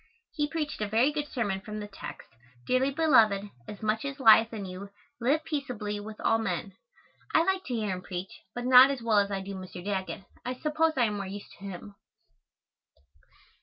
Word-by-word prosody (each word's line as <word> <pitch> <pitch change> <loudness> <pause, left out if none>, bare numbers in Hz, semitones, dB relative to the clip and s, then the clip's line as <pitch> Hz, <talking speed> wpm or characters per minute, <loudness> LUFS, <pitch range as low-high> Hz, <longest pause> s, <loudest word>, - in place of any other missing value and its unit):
He 295 -2 0
preached 305 -6 -3
a 210 - 0
very 230 +7 +3
good 295 0 -3
sermon 205 -9 -2
from 210 +1 -6
the 210 - -6
text, 200 - -9 0.4
"Dearly 255 +2 +2
beloved, 220 -10 +3 0.2
as 210 - -9
much 215 +1 0
as 280 0 -5
lieth 225 -2 +7
in 210 -4 -5
you, 185 +2 -8 0.3
live 280 +6 +2
peaceably 245 -10 -3
with 215 +1 -9
all 225 - +3
men." 195 -2 -3 0.6
I 325 - +6
like 380 +1 0
to 250 - -3
hear 215 -3 -1
him 185 -1 -4
preach, 180 +1 -7
but 245 0 -4
not 255 +1 +9
as 270 -4 -3
well 220 -3 +4
as 200 0 +1
I 195 -1 -2
do 195 +1 -6
Mr. 185 -1 -8
Daggett. 195 -1 -3 0.2
I 250 +1 -3
suppose 310 +4 +1
I 245 - +4
am 210 -2 -2
more 195 -1 -4
used 200 +1 -8
to 200 - -10
him. 200 +1 -8
220 Hz, 200 wpm, -29 LUFS, 200-270 Hz, 0.6 s, not